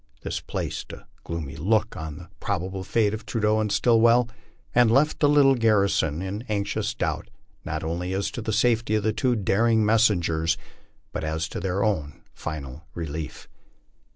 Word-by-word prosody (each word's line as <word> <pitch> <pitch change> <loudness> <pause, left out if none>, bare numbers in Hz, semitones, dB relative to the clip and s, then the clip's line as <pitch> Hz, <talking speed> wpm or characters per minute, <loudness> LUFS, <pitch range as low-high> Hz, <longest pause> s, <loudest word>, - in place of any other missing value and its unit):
This - - -2
placed - - -5
a - - -11 0.2
gloomy 80 -4 -5
look 110 +8 +1
upon 80 -2 -6
the 85 - -11
probable 95 -1 -3
fate 105 +2 +1
of 110 - -5
Trudeau 110 -1 +1
and 105 -1 0
Stillwell, 115 +2 +4 0.4
and 120 -1 +5
left 140 +7 +3
the 145 - +4
little 145 -2 +6
garrison 100 - +2
in 100 +3 -4
anxious 100 -2 -1
doubt - - -2 0.3
not - - -4
only 85 +3 -2
as 95 +1 -1
to 120 - -5
the 110 - -2
safety 115 -1 +2
of 105 - +1
the 110 +1 +1
two 125 +2 +1
daring 110 +2 +2
messengers, 85 -8 +2 0.5
but - - -4
as 80 +1 -1
to - - -5
their 95 +2 -1
own 80 -9 -1
final 75 -1 -7
relief. 80 -2 -5
100 Hz, 165 wpm, -25 LUFS, 85-115 Hz, 0.5 s, little